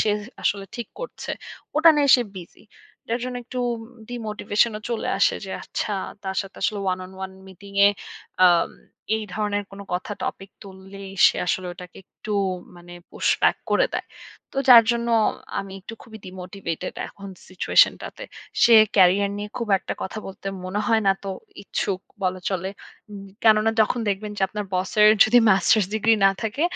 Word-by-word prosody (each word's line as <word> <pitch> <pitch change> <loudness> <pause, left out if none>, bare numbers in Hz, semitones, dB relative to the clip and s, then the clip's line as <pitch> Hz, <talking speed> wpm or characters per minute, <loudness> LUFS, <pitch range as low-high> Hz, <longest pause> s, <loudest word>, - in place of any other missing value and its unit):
সে 215 - +2 0.3
আসলে 200 -1 0
ঠিক 235 - -6
করছে। - - -7 0.5
ওটা 320 +2 +7
নিয়ে 290 -1 +3
সে 245 - 0
বিজি। 175 -2 -11 0.4
যার 235 +2 -1
জন্য 250 0 -4
একটু 250 +1 -5 0.5
ডিমোটিভেশন 220 -1 0
ও - - -15
চলে। 235 -2 -2
আসে - - +3
যে 190 - -8
আচ্ছা 210 - -3 0.3
তার 190 0 -3
সাথে 195 -1 -14
আসলে 210 - 0
one 185 - -5
on 185 - -12
one 190 0 -9
মিটিং 200 +2 -13
এ - - +7 0.6
আ - - +9 0.7
এই 220 - -4
ধরনের 205 -1 -1
কোনো 200 0 -10
কথা 180 +3 -3
টপিক 195 0 -5
তুললেই 195 0 -11 0.2
সে - - +2
আসলে 185 +1 -1
ওটাকে 180 0 -12
একটু 215 - -8 0.4
মানে 175 0 -13 0.2
push - - 0
back - - +4
করে - - +4
দেয়। - - -3 0.5
তো - - -13
যার 235 -3 +10
জন্য 235 0 -1 0.5
আমি 195 -1 -9
একটু 210 +4 -9
খুবই 220 -2 -12
ডিমোটিভেটেড 185 -2 -6
এখন 200 0 -11 0.2
সিচুয়েশন 185 - +4
টাতে। - - -8 0.4
সে 235 - +7 0.2
ক্যারিয়ার 195 +1 +5
নিয়ে 205 0 -5
খুব 235 -3 -4
একটা - - -5
কথা 190 - -5
বলতে 195 +1 -10 0.2
মনে 185 +3 -2
হয় 225 -1 +3
না 195 - +6
তো 195 - -3 0.3
ইচ্ছুক 195 -1 -2 0.2
বলা 185 0 -1
চলে। 190 -1 -2 0.7
কেননা 220 0 +5
যখন 220 +3 +2
দেখবেন 205 +1 -2
যে - - -2
আপনার 210 +1 -4
বসের 200 +3 +4 0.2
যদি 235 +3 +5
মাস্টার্স 195 +1 +4
ডিগ্রি 220 +1 +3
না - - +6
থাকে 225 +7 -2
200 Hz, 170 wpm, -23 LUFS, 190-220 Hz, 0.7 s, যার